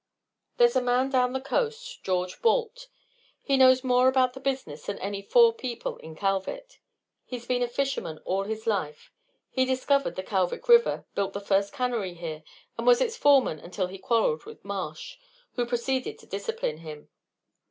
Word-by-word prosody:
"There's 480 Hz, -1 st, +5 dB
a -, -, +4 dB
man 250 Hz, +2 st, +1 dB
down 250 Hz, -1 st, +2 dB
the 265 Hz, -, -1 dB
coast, 475 Hz, -, -3 dB
George 180 Hz, -1 st, -2 dB
Balt, -, -, +1 dB, 0.6 s
who 275 Hz, -, +2 dB
knows 260 Hz, 0 st, +6 dB
more 250 Hz, 0 st, +4 dB
about 260 Hz, -1 st, +3 dB
the 265 Hz, -, -9 dB
business 260 Hz, -, -4 dB
than 205 Hz, -, -3 dB
any 200 Hz, +1 st, -4 dB
four 465 Hz, -, +5 dB
people 250 Hz, -, -5 dB
in 160 Hz, 0 st, -11 dB
Kalvik. 195 Hz, -, -3 dB, 0.4 s
He's 245 Hz, -2 st, -7 dB
been 245 Hz, 0 st, 0 dB
a 245 Hz, -, +2 dB
fisherman 245 Hz, -, -2 dB
all 195 Hz, +1 st, -1 dB
his 220 Hz, +1 st, -5 dB
life. 160 Hz, -9 st, -2 dB, 0.4 s
He 260 Hz, -, +2 dB
discovered 260 Hz, +2 st, +1 dB
the 185 Hz, -, -4 dB
Kalvik 190 Hz, -, -1 dB
River, 475 Hz, 0 st, +5 dB
built 195 Hz, -1 st, -1 dB
the 200 Hz, -, -3 dB
first 200 Hz, 0 st, +1 dB
cannery 240 Hz, -9 st, -2 dB
here, 160 Hz, -2 st, -6 dB, 0.4 s
and -, -, -3 dB
was -, -, +7 dB
its 470 Hz, -2 st, 0 dB
foreman 275 Hz, -, +4 dB
until 185 Hz, +4 st, -3 dB
he 185 Hz, +1 st, -8 dB
quarrelled 200 Hz, -8 st, +1 dB
with -, -, -12 dB
Marsh, 185 Hz, -6 st, -5 dB, 0.4 s
who 245 Hz, -1 st, -1 dB
proceeded 255 Hz, +2 st, -2 dB
to -, -, -17 dB
discipline 455 Hz, -, -3 dB
him. 155 Hz, -2 st, -10 dB
245 Hz, 175 wpm, -27 LUFS, 195-275 Hz, 0.6 s, was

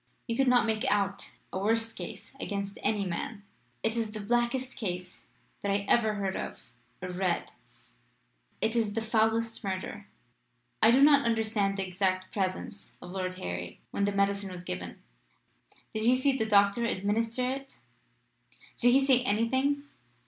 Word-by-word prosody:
"You 230 Hz, -, -2 dB
could 270 Hz, +2 st, +2 dB
not 245 Hz, -2 st, +5 dB
make 220 Hz, -1 st, 0 dB
out 200 Hz, -1 st, 0 dB, 0.2 s
a 185 Hz, -, -1 dB
worse 225 Hz, +3 st, +1 dB
case -, -, -8 dB
against 200 Hz, -4 st, -4 dB
any 205 Hz, -1 st, +1 dB
man. 200 Hz, +4 st, -4 dB, 0.4 s
It 225 Hz, +1 st, +1 dB
is 225 Hz, -2 st, -1 dB
the 215 Hz, -, -5 dB
blackest 240 Hz, +4 st, 0 dB
case 180 Hz, -4 st, -5 dB, 0.3 s
that 200 Hz, -, 0 dB
I 200 Hz, 0 st, 0 dB
ever 220 Hz, -3 st, +3 dB
heard 195 Hz, -2 st, -2 dB
of -, -, -5 dB, 0.4 s
or 185 Hz, -, -3 dB
read. 180 Hz, -1 st, -1 dB, 1.1 s
It 225 Hz, -, +1 dB
is 220 Hz, -3 st, +1 dB
the 225 Hz, -, 0 dB
foulest 225 Hz, 0 st, +1 dB
murder. 195 Hz, +1 st, -4 dB, 0.7 s
I 220 Hz, -, +7 dB
do 260 Hz, +4 st, +6 dB
not 285 Hz, -1 st, +7 dB
understand 220 Hz, -4 st, +1 dB
the 195 Hz, -1 st, -2 dB
exact 185 Hz, 0 st, -1 dB
presence 195 Hz, +1 st, -3 dB
of 175 Hz, -, -9 dB
Lord 185 Hz, -1 st, -3 dB
Harry 90 Hz, -, -5 dB
when 200 Hz, -, +1 dB
the 205 Hz, -, +1 dB
medicine 200 Hz, 0 st, +1 dB
was 180 Hz, -1 st, -7 dB
given. 90 Hz, -, -6 dB, 0.9 s
Did 220 Hz, -, -2 dB
he 240 Hz, +3 st, +5 dB
see 260 Hz, +1 st, +2 dB
the 220 Hz, -4 st, 0 dB
doctor 200 Hz, +2 st, +4 dB
administer 230 Hz, +4 st, 0 dB
it? 270 Hz, 0 st, -6 dB, 1.0 s
Did 245 Hz, 0 st, +5 dB
he 270 Hz, +1 st, +5 dB
say 260 Hz, -2 st, +5 dB
anything?" 260 Hz, +6 st, +1 dB
215 Hz, 160 wpm, -30 LUFS, 195-235 Hz, 1.1 s, I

